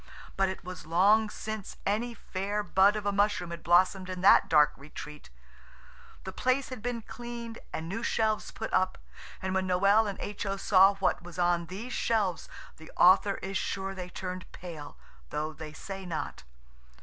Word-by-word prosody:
But 195 -1 +2
it 190 - -6
was 180 -4 -8
long 205 +6 +4
since 215 -1 -6
any 230 +4 -1
fair 205 +1 -3
bud 200 +1 +4
of 210 -1 -4
a 205 - +2
mushroom 200 -3 +1
had 170 - -6
blossomed 185 +2 +3
in 185 -1 -5
that 190 - +6
dark 150 -2 +5
retreat. 150 - -10 0.9
The 190 - -6
place 255 +5 0
had 255 -4 -7
been 235 -1 -3
cleaned 235 -1 -7
and 160 - -4
new 205 +6 -4
shelves 220 -2 0
put 220 - -6
up, 185 0 +2 0.5
and 190 0 -1
when 190 0 0
Noël 200 +4 +4
and 195 - -6
H.O. 200 -1 -3
saw 195 0 +5
what 195 -1 0
was 175 -1 -11
on 175 -1 +1
these 210 +8 -6
shelves 205 -6 0 0.3
the 160 0 -13
author 195 +2 +6
is 195 0 -2
sure 195 0 -3
they 180 -1 -7
turned 185 0 -6
pale, 160 -5 -9 0.3
though 155 +1 -3
they 155 +1 -8
say 195 +5 -7
not. 160 - -5
190 Hz, 175 wpm, -29 LUFS, 175-210 Hz, 0.9 s, that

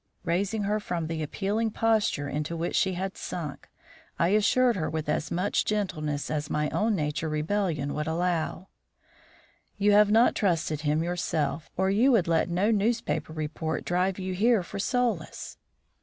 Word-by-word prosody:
Raising 195 +5 0
her 210 +2 0
from 175 -5 -3
the 160 0 -3
appealing 205 +8 -1
posture 215 -10 +1
into 150 +3 -3
which 170 +1 -2
she 190 - +2
had 190 +2 -3
sunk, 155 -5 -6 0.5
I 170 - +2
assured 225 +4 +3
her 160 -5 -2
with 155 -1 -3
as 150 +1 -1
much 185 +4 0
gentleness 155 -10 -2
as 150 -1 -2
my 150 0 0
own 215 -1 +1
inner 150 +1 -2
rebellion 155 -2 -1
would 150 0 -3
allow: 170 +2 -1 1.1
"You 205 0 +3
have 205 0 +6
not 225 +3 +5
trusted 165 -6 0
him 150 +1 +1
yourself, 165 -3 -2
or 190 +1 +2
you 235 +7 +4
would 195 -8 +3
let 165 +1 +2
no 185 +6 +2
newspaper 225 -4 0
report 155 0 -3
drive 180 +1 0
you 185 -1 -3
here 215 +1 +3
for 200 - -7
solace." 225 -6 -2
180 Hz, 160 wpm, -27 LUFS, 155-205 Hz, 1.1 s, have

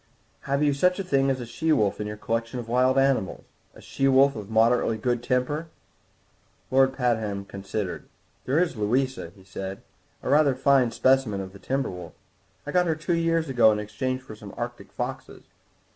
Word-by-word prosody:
"Have 140 +2 +1
you 145 -1 +3
such 180 +6 +2
a 195 - -2
thing 135 -6 +2
as 130 -1 0
a 120 - -5
she 160 +7 -1
wolf 105 -8 +2
in 105 - -3
your 105 0 -6
collection 115 +3 -3
of 120 - -7
wild 130 +2 +2
animals? 135 -7 +1 0.3
A - - -14
she 135 - -1
wolf 135 +1 +5
of 105 -2 -7
moderately 115 0 +3
good 120 +2 -1
temper?" 130 +6 -1 1.0
Lord 135 0 +4
Pabham 110 -6 -1
considered. 100 -1 -5 0.4
"There 135 +4 +1
is 180 -5 +1
Louisa," 125 -1 -1
he 95 - -17
said, 95 0 -7 0.4
"a - - -3
rather 145 -2 +4
fine 130 -2 +3
specimen 130 -3 +2
of 95 -1 -7
the 100 - -12
timber 135 +2 -2
wolf. 90 -2 -9 0.5
I 145 - -4
got 180 +1 +2
her 160 - +1
two 155 +3 -2
years 165 -1 +1
ago 120 -5 +5
in 105 - 0
exchange 130 +5 -3
for 110 -4 -10
some 105 -2 -11
Arctic - - -6
foxes. - - -6
125 Hz, 190 wpm, -25 LUFS, 105-135 Hz, 1.0 s, wolf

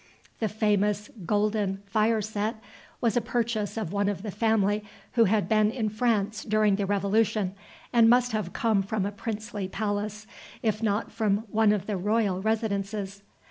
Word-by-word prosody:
The 220 - 0
famous 210 -1 +1 0.2
"golden" 205 -1 0
fire 215 +2 +1
set 215 +2 -2 0.5
was 230 -3 +2
a 240 - +3
purchase 230 -3 -1
of 205 -5 -3
one 200 0 +1
of 200 -1 -4
the 210 - -4
family 210 -1 +1 0.3
who 230 -2 +4
had 210 +1 +2
been 215 -1 +3
in 225 -2 -1
France 215 -1 0
during 215 -1 +3
the 200 -1 -1
Revolution, 200 0 +1 0.4
and 230 -1 +6
must 245 +1 +4
have 215 -5 -2
come 220 -4 +1
from 195 0 -2
a 200 - -2
princely 210 -1 -4
palace, 210 +1 -3 0.4
if 215 -1 0
not 210 0 0
from 215 -1 0
one 220 -1 +4
of 205 -2 0
the 205 -2 -2
royal 205 -1 +1
residences. 205 -2 -2
210 Hz, 165 wpm, -27 LUFS, 200-220 Hz, 0.5 s, and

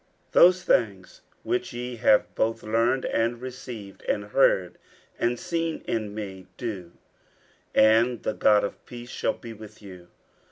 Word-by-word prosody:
50:004:009 - - -39
Those 180 +1 +6
things, - - 0 0.2
which 370 - -2
ye 120 0 -5
have 105 -1 +3
both 115 +1 -1
learned, 115 +4 +1
and 115 +1 0
received, 125 -5 -8
and 105 - -1
heard, 105 -5 +2 0.4
and 120 0 0
seen 165 -1 -3
in 105 -2 -2
me, 95 -3 -7
do: 95 -8 -6 0.8
and 115 +2 +4
the 110 - -1
God 105 0 +4
of 100 - -5
peace 120 0 -9
shall - - -1
be 115 -2 -10
with 110 0 -13
you. 90 -4 -12
115 Hz, 150 wpm, -26 LUFS, 105-125 Hz, 0.8 s, Those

